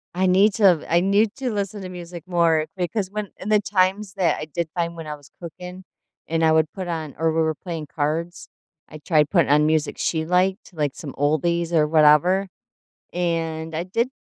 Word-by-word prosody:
I 185 +1 +1
need 195 +3 +4
to 190 -8 +4
I 170 - +5
need 200 +3 +2
to 265 -3 -3
listen 205 -1 -3
to 185 - -7
music 175 -2 -9
more 165 -3 +2
because 185 +2 -2
when 210 -2 -4
in 200 - -6
the 215 - +4
times 195 0 0
that 190 -4 +1
I - - -4
did 160 +2 -4
find 170 -1 -2
when 165 -2 -8
I 150 - -4
was 145 -2 -18
cooking 180 +2 -9 0.4
and 165 0 0
I 160 - +5
would 160 0 +2
put 185 -2 -5
on 160 -4 -4
or 160 +2 +1
we 165 - +1
were 160 -1 0
playing 165 -3 -6
cards, 160 +4 -2 0.4
I 155 - -10
tried 150 -1 +2
putting 170 -6 +2
on 150 +1 +4
music 155 -1 0
she 160 -1 -1
liked, 185 +3 0
like 150 -4 -2
some 145 -4 -8
oldies 165 +4 0
or 155 -2 +3
whatever. 160 +5 +4 0.7
And 165 -2 -2
I 165 - -1
did 230 +7 -1
170 Hz, 205 wpm, -22 LUFS, 160-185 Hz, 0.7 s, I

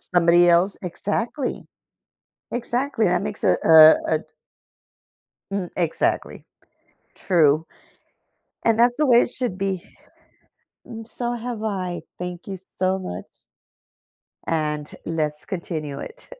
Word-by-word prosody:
Somebody 175 0 +4
else? 175 +3 +3
Exactly. 215 - -3 0.9
Exactly, 245 0 -1
that 180 +1 +1
makes 210 0 -4
a - - +4
a 160 0 +7
a - - +2
d - - -15 1.3
Mm, 190 -3 -3
exactly. 170 -3 -1 0.7
True. 160 -4 +2 1.0
And, 230 -1 +3
that's 240 +1 +4
the 300 0 +2
way 240 -1 +6
it - - -2
should 245 -8 -3
be. 190 -2 -2 1.0
And, 225 -1 -9
so 240 0 -3
have 235 -2 -5
I, 185 -4 -3 0.2
thank 180 0 -6
you 195 - -5 0.2
so 190 +1 0
much. 90 - -6 1.2
And, 150 -2 -2 0.2
let's 155 -2 -2
continue 155 -6 -5
it. - - -7
185 Hz, 115 wpm, -23 LUFS, 165-225 Hz, 1.3 s, a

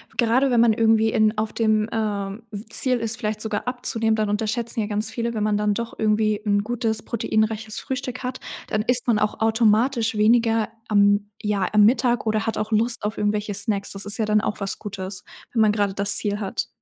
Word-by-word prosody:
gerade 250 +3 +2
wenn 235 -1 +4
man 235 -1 +5
irgendwie 220 0 +3
in 215 0 +2
auf 215 0 -1
dem, 215 -1 +1
ähm, 205 -1 -3
w 205 -1 -7
Ziel 250 +2 +3
ist, 230 0 -3
vielleicht 215 -3 -3
sogar 220 +1 -3
abzunehmen, 230 -3 0
dann 215 -1 -1
unterschätzen 220 +3 -2
ja 210 - -1
ganz 215 +1 -2
viele: 235 0 -3
Wenn 215 - -2
man 210 -1 +1
dann 210 0 +1
doch 235 +2 -6
irgendwie 215 -1 +1
'n 205 -1 +1
gutes, 225 -1 -2
proteinreiches 220 -1 -2
Frühstück 260 -1 -5
hat, 255 0 -4 0.3
dann 215 0 0
isst 245 +1 +1
man 230 -3 +2
auch 215 0 -2
automatisch 225 +1 +2
weniger 225 +1 +2 0.2
am 205 0 +3
ja, 205 -3 0
am 210 -1 +6
Mittag 240 +1 +2
oder 215 0 0
hat 225 - -2
auch 215 +1 -3
Lust 230 +1 +1
auf 210 +1 -3
irgendwelche 210 0 -1
Snacks. 200 0 -2
Das 195 0 -6
ist 205 +1 +1
ja 220 - 0
dann 210 0 +2
auch 210 - -4
was 195 - -2
Gutes, 195 -2 -6 0.3
wenn 225 - +1
man 215 -1 +4
grade 205 -2 0
das 200 +1 +5
Ziel 205 0 +2
hat. 205 +2 -3
215 Hz, 210 wpm, -23 LUFS, 210-230 Hz, 0.3 s, am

